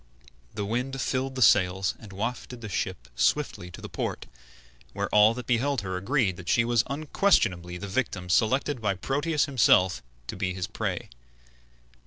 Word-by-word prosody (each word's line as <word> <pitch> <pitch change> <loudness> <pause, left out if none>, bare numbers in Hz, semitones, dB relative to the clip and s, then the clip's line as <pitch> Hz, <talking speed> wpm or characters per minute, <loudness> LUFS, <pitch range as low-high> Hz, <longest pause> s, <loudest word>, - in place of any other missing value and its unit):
The 105 - -2
wind 125 +5 -2
filled 130 0 -1
the 130 - +3
sails 95 -2 +4
and 105 -3 -12
wafted 120 +4 -4
the 110 - -6
ship - - -3
swiftly 90 +7 0
to - - -11
the - - -6
port, - - -4 0.7
where - - -2
all 105 +2 +5
that 125 -1 -6
beheld 125 +1 +1
her 95 -2 -4
agreed 100 -1 0
that 90 0 -7
she 115 - +3
was 120 -1 +3
unquestionably 135 - +1
the 100 - -6
victim 100 -4 -2
selected 125 +7 +1
by 100 -3 0
Proteus 145 - 0
himself 110 - +3 0.2
to - - -6
be 90 -1 -2
his 90 -2 -2
prey. - - -4
110 Hz, 165 wpm, -27 LUFS, 95-130 Hz, 0.7 s, all